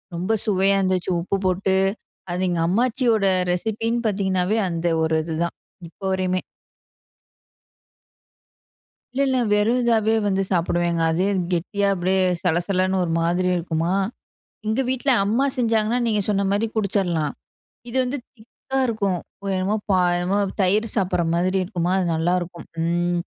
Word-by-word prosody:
ரொம்ப 185 Hz, +6 st, -1 dB
சுவையா 195 Hz, -1 st, +3 dB
இருந்துச்சு. 185 Hz, -1 st, 0 dB
உப்பு 195 Hz, +3 st, -1 dB
போட்டு, 190 Hz, +1 st, +1 dB, 0.6 s
அது 185 Hz, +1 st, 0 dB
எங்க 175 Hz, -2 st, 0 dB
அம்மாச்சியோட 230 Hz, +1 st, +2 dB, 0.3 s
ரெசிபின்னு 225 Hz, +5 st, -1 dB
பார்த்தீங்கனாவே 190 Hz, 0 st, 0 dB
அந்த 170 Hz, 0 st, -1 dB, 0.2 s
ஒரு 160 Hz, 0 st, +1 dB
இதுதான். 170 Hz, +1 st, -2 dB, 0.3 s
இப்போ 195 Hz, -, -14 dB
வரையுமே. 185 Hz, -1 st, 0 dB, 2.7 s
இல்ல, 275 Hz, -, 0 dB
இல்ல. 260 Hz, -, +1 dB
வெறும் 210 Hz, +4 st, +3 dB
இதாவே 225 Hz, -2 st, +3 dB
வந்து 195 Hz, -1 st, +1 dB
சாப்பிடுவேங்க. 175 Hz, -1 st, 0 dB
அதே 180 Hz, +4 st, +1 dB, 0.2 s
கெட்டியா 200 Hz, +4 st, 0 dB
அப்டியே 185 Hz, +1 st, 0 dB, 0.2 s
சலசலன்னு 185 Hz, +2 st, +1 dB
ஒரு 170 Hz, -, -2 dB
மாதிரி 175 Hz, +2 st, +1 dB
இருக்குமா. 165 Hz, 0 st, -1 dB, 0.7 s
எங்க 220 Hz, +5 st, +1 dB
வீட்ல 260 Hz, +2 st, -1 dB, 0.2 s
அம்மா 235 Hz, +7 st, +2 dB
செஞ்சாங்கன்னா, 230 Hz, 0 st, +1 dB
நீங்க 210 Hz, -2 st, +1 dB
சொன்ன 200 Hz, -1 st, +1 dB
மாரி 205 Hz, +3 st, +1 dB
குடிச்சுறலாம். 180 Hz, -8 st, 0 dB, 0.6 s
இது 250 Hz, -, -2 dB
வந்து 255 Hz, +3 st, -2 dB, 0.2 s
திக்கா 235 Hz, +4 st, -7 dB
இருக்கும். 200 Hz, -6 st, 0 dB, 0.4 s
என்னமோ 190 Hz, +3 st, 0 dB, 0.4 s
என்னமோ 180 Hz, +3 st, 0 dB, 0.2 s
தயிர் 205 Hz, +4 st, +2 dB
சாப்பிடுற 185 Hz, -4 st, +1 dB
மாதிரி 185 Hz, +2 st, +1 dB
இருக்குமா 180 Hz, -2 st, -2 dB
அது 190 Hz, -, +1 dB
நல்லாயிருக்கும். 175 Hz, +1 st, -1 dB, 0.2 s
ம். 175 Hz, +1 st, 0 dB
190 Hz, 125 wpm, -22 LUFS, 175-215 Hz, 2.7 s, சுவையா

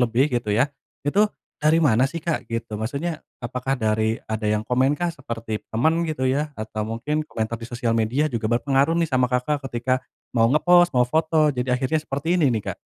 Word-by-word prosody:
lebih 125 Hz, +4 st, +2 dB
gitu 120 Hz, -3 st, -1 dB
ya, 135 Hz, +6 st, +2 dB, 0.3 s
itu 200 Hz, +9 st, +3 dB, 0.3 s
dari 155 Hz, +2 st, +4 dB
mana 125 Hz, -3 st, +4 dB
sih 165 Hz, +3 st, -5 dB
Kak 165 Hz, -1 st, -2 dB
gitu? 115 Hz, -2 st, -3 dB
Maksudnya 150 Hz, +8 st, -3 dB, 0.2 s
apakah 125 Hz, +3 st, -2 dB
dari 110 Hz, -1 st, 0 dB
ada 110 Hz, -1 st, -2 dB
yang 105 Hz, 0 st, +1 dB
komen 130 Hz, +4 st, +2 dB
kah 175 Hz, -1 st, 0 dB
seperti 115 Hz, -8 st, -5 dB
teman 160 Hz, +9 st, +2 dB
gitu 140 Hz, -4 st, -2 dB
ya 150 Hz, +3 st, 0 dB
atau 110 Hz, 0 st, -4 dB
mungkin 150 Hz, +8 st, -2 dB
komentar 110 Hz, -2 st, -3 dB
di 115 Hz, -, -6 dB
sosial 120 Hz, -1 st, -1 dB
media 120 Hz, +7 st, +1 dB
juga 115 Hz, -3 st, -2 dB
berpengaruh 135 Hz, +5 st, +2 dB
nih 165 Hz, -2 st, +1 dB
sama 130 Hz, -1 st, +3 dB
Kakak 135 Hz, +3 st, 0 dB
ketika 130 Hz, +1 st, 0 dB, 0.4 s
mau 115 Hz, -1 st, +4 dB
nge-post, 175 Hz, +4 st, +5 dB
mau 125 Hz, 0 st, +5 dB
foto 155 Hz, +2 st, +2 dB
jadi 125 Hz, 0 st, 0 dB
akhirnya 130 Hz, +5 st, 0 dB
seperti 160 Hz, +6 st, -1 dB
ini 150 Hz, -, +4 dB
nih 110 Hz, -, -1 dB
Kak? -, -, -15 dB
130 Hz, 195 wpm, -23 LUFS, 115-155 Hz, 0.4 s, nge-post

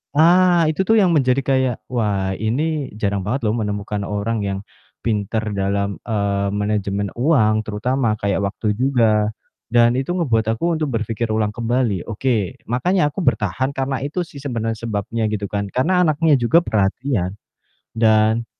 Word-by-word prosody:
ah, 175 Hz, +2 st, +5 dB
itu 155 Hz, -, -10 dB
tuh 225 Hz, -, +5 dB
yang 180 Hz, -3 st, +3 dB
menjadi 135 Hz, -3 st, +2 dB
kayak, 130 Hz, -2 st, +1 dB, 0.2 s
"Wah 100 Hz, -5 st, 0 dB
ini 145 Hz, +6 st, -1 dB
jarang 100 Hz, -1 st, 0 dB
banget 125 Hz, +7 st, -1 dB
loh 105 Hz, -, +2 dB
menemukan 105 Hz, -1 st, -3 dB
orang 105 Hz, +2 st, -2 dB
yang 95 Hz, 0 st, -2 dB, 0.4 s
pinter 110 Hz, -1 st, -1 dB, 0.2 s
dalam, 100 Hz, +1 st, 0 dB, 0.2 s
eee, 100 Hz, -3 st, 0 dB
manajemen 100 Hz, -1 st, -1 dB
uang 120 Hz, -6 st, +3 dB
terutama, 115 Hz, +2 st, 0 dB
kayak 100 Hz, -1 st, 0 dB
waktu 105 Hz, +2 st, -3 dB
juga." 115 Hz, -5 st, +2 dB, 0.4 s
Dan 120 Hz, 0 st, +4 dB
itu 155 Hz, +7 st, -2 dB
ngebuat 120 Hz, -, +1 dB
aku 170 Hz, +7 st, 0 dB
untuk 155 Hz, -, 0 dB
berpikir 115 Hz, +1 st, -2 dB
ulang 105 Hz, -1 st, +1 dB
kembali, 115 Hz, -4 st, -1 dB
oke. 110 Hz, -4 st, -1 dB, 0.2 s
Makanya 150 Hz, +6 st, +2 dB
aku 170 Hz, -, -6 dB
bertahan 125 Hz, +7 st, 0 dB
karena 135 Hz, 0 st, -1 dB
itu 155 Hz, +6 st, -2 dB
sih 160 Hz, -, -13 dB
sebenarnya 115 Hz, -5 st, -3 dB
sebabnya 110 Hz, +1 st, -2 dB
gitu 105 Hz, -2 st, -3 dB
kan, 100 Hz, 0 st, -1 dB
karena 180 Hz, +9 st, +2 dB
anaknya 155 Hz, -1 st, +3 dB
juga 140 Hz, +8 st, +4 dB
perhatian 100 Hz, -, 0 dB, 0.6 s
dan 110 Hz, +1 st, +3 dB
115 Hz, 150 wpm, -20 LUFS, 105-135 Hz, 0.6 s, ah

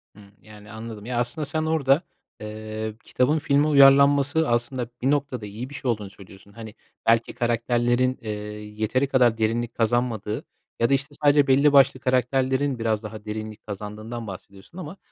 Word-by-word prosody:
Hımm, 100 Hz, -1 st, -16 dB
yani, 105 Hz, 0 st, -14 dB
anladım. 110 Hz, -1 st, -8 dB
Ya, 120 Hz, -1 st, -2 dB
aslında, 150 Hz, +5 st, -2 dB
sen 155 Hz, +2 st, -2 dB
orada, 155 Hz, -2 st, +2 dB, 0.4 s
eee, 110 Hz, 0 st, -6 dB
kitabın 145 Hz, +5 st, +1 dB
filme 145 Hz, 0 st, +2 dB
uyarlanması, 140 Hz, +2 st, +5 dB
aslında, 120 Hz, +1 st, -1 dB
bir 135 Hz, +3 st, +2 dB
noktada 140 Hz, -6 st, -1 dB
iyi 110 Hz, +6 st, -7 dB
bir -, -, -12 dB
şey 125 Hz, -3 st, -1 dB
olduğunu 105 Hz, -3 st, -4 dB
söylüyorsun. 100 Hz, +1 st, -16 dB
Hani, 110 Hz, 0 st, -9 dB, 0.3 s
belki, 115 Hz, 0 st, +3 dB
karakterlerin, 120 Hz, +2 st, +1 dB
eee, 110 Hz, -2 st, -5 dB, 0.5 s
yeteri 130 Hz, +6 st, +1 dB
kadar 125 Hz, -4 st, +3 dB
derinlik 115 Hz, +1 st, -1 dB
kazanmadığı 115 Hz, -2 st, -1 dB, 0.3 s
ya 115 Hz, -, +2 dB
da, 140 Hz, -, +3 dB
işte, 140 Hz, +2 st, -1 dB
sadece 145 Hz, -1 st, +5 dB
belli 140 Hz, +2 st, +4 dB
başlı 135 Hz, -1 st, +5 dB
karakterlerin 130 Hz, +1 st, 0 dB
biraz 110 Hz, -1 st, -1 dB
daha 105 Hz, 0 st, -8 dB
derinlik 110 Hz, 0 st, -6 dB
kazandığından 105 Hz, +3 st, -7 dB
bahsediyorsun 100 Hz, -, -11 dB
ama 180 Hz, +1 st, -7 dB
120 Hz, 160 wpm, -24 LUFS, 110-140 Hz, 0.5 s, uyarlanması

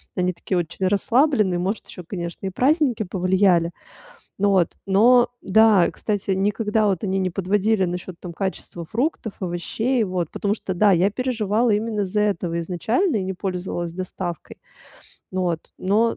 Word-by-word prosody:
Они 180 Hz, -1 st, +1 dB
такие 180 Hz, +1 st, -3 dB
очень 175 Hz, +2 st, -1 dB
расслабленные, 210 Hz, -, +2 dB
может, 195 Hz, +4 st, -2 dB
ещё, 180 Hz, -, -9 dB
конечно, 175 Hz, -1 st, -5 dB
и -, -, 0 dB
праздники 260 Hz, -, +2 dB
повлияли. 185 Hz, -2 st, +2 dB, 0.7 s
Вот, 195 Hz, -4 st, +3 dB
но, 240 Hz, +6 st, +5 dB
да, 210 Hz, -2 st, +5 dB
кстати, 205 Hz, -2 st, -3 dB
никогда 210 Hz, +3 st, +1 dB
вот 195 Hz, -3 st, 0 dB
они 190 Hz, -1 st, 0 dB
не 185 Hz, -1 st, 0 dB
подводили 195 Hz, +3 st, +1 dB
насчёт, 180 Hz, +1 st, -4 dB
там, 175 Hz, -, -7 dB
качества 180 Hz, -2 st, -5 dB
фруктов, 230 Hz, -, -2 dB
овощей, 210 Hz, +8 st, -1 dB
вот 180 Hz, -4 st, -2 dB
потому 205 Hz, 0 st, -1 dB
что, 195 Hz, -, -5 dB
да, 205 Hz, +3 st, +4 dB
я 185 Hz, +3 st, +3 dB
переживала 230 Hz, -1 st, 0 dB
именно 215 Hz, 0 st, 0 dB
из-за 200 Hz, +2 st, -1 dB
этого 175 Hz, -5 st, -1 dB
изначально 220 Hz, -, 0 dB
и 200 Hz, -, 0 dB
не 190 Hz, -, -2 dB
пользовалась 180 Hz, -2 st, -4 dB
доставкой. 180 Hz, -1 st, -6 dB, 0.8 s
Вот, 180 Hz, -3 st, -2 dB
но, 220 Hz, +5 st, +2 dB
195 Hz, 150 wpm, -22 LUFS, 180-215 Hz, 0.8 s, но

